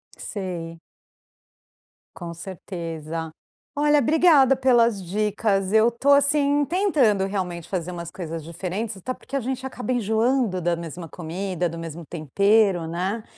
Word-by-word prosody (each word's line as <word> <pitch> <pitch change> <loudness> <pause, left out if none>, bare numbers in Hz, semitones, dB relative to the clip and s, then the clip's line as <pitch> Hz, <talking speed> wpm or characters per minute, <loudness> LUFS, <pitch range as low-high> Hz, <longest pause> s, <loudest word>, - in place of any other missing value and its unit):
Sei. 170 -4 -6 1.4
Com 170 -2 -7
certeza. 165 -3 -6 0.4
Olha, 295 0 +4
obrigada 295 -2 +5
pelas 235 -6 +3
dicas. 200 0 0
Eu 220 +2 +5
tô 235 +4 -1
assim, 285 0 +4
tentando 280 - +2
realmente 180 -4 -4
fazer 180 -2 -3
umas 170 -1 -6
coisas 165 -2 -6
diferentes, 190 +6 -4
até 255 +7 -4
porque 275 - -9
a - - +2
gente 260 +1 -4
acaba 250 -1 -5
enjoando 225 -2 +1
da 175 0 0
mesma 170 0 -7
comida, 180 +2 -3
do 165 - -7
mesmo 165 0 -7
tempero, 190 +2 +2
né. 190 +6 -2
195 Hz, 130 wpm, -24 LUFS, 170-250 Hz, 1.4 s, obrigada